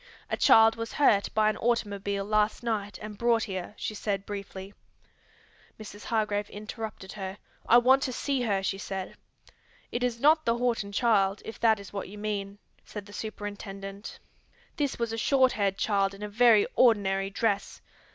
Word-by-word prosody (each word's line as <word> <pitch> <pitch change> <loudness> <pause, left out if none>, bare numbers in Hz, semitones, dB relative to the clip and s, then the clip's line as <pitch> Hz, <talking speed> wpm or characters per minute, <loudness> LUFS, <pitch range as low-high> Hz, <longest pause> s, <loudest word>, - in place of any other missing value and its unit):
"A - - +2
child 225 0 +6
was 230 0 -5
hurt 210 -9 +3
by 215 0 +4
an 215 - +1
automobile 200 -4 -1
last 215 +2 +1
night 210 -3 -2
and 210 -1 -8
brought 235 -1 +2
here," 190 -1 -5
she - - -4
said 200 -2 -3
briefly. 200 -1 -7 1.1
Mrs. 210 -2 -10
Hargrave 210 -2 -1
interrupted 215 -2 -7
her. 195 -1 -6 0.3
"I 235 - +8
want 260 +3 +5
to 265 - -1
see 270 +1 -1
her," 200 -5 0
she 195 0 -2
said. 190 -1 -5 0.8
"It 240 - -2
is 240 -2 -1
not 310 +4 +4
the 230 -3 +1
Horton 235 -4 -1
child, 200 -3 +2
if 225 - -8
that 220 -2 +3
is 200 0 -11
what 200 -2 -5
you 205 - -10
mean," 205 -1 -4 0.3
said 210 -2 -8
the 205 - -14
superintendent. 200 -1 -7 0.6
"This 290 -4 -1
was 235 -1 -2
a 225 - -3
short 260 +1 +3
haired 195 -2 0
child 200 -2 +1
in 200 - -10
a - - -3
very 220 -1 +5
ordinary 195 -5 +3
dress. 200 0 -1
210 Hz, 170 wpm, -28 LUFS, 200-230 Hz, 1.1 s, I